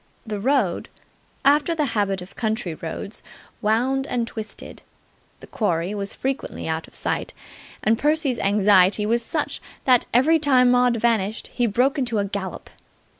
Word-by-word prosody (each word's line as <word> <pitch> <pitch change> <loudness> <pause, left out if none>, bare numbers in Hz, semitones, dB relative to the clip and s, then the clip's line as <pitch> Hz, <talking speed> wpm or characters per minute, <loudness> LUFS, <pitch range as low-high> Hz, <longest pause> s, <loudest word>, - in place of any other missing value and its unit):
The 210 -2 -4
road, 240 -6 0 0.6
after 295 +4 +4
the 305 -2 +1
habit 195 -3 0
of 180 - -15
country 220 -6 -2
roads, 165 +6 -6 0.4
wound 250 +5 +1
and 235 -2 -1
twisted. 220 -2 -8 0.6
The - - -10
quarry 180 -3 -1
was 200 -1 -4
frequently 270 -8 -4
out 160 0 -3
of - - -16
sight. - - -3 0.5
And 225 +1 +2
Percy's 295 -4 +1
anxiety 200 0 +4
was 235 +2 +1
such 300 +5 -3 0.2
that, 250 -2 +4
every 305 +7 +4
time 255 -4 +4
Maud 245 -1 +3
vanished, 220 -2 0
he 245 -1 +1
broke 250 +7 +1
into 240 -4 -1
a 200 - +1
gallop. 195 -1 -6
230 Hz, 150 wpm, -23 LUFS, 200-260 Hz, 0.6 s, after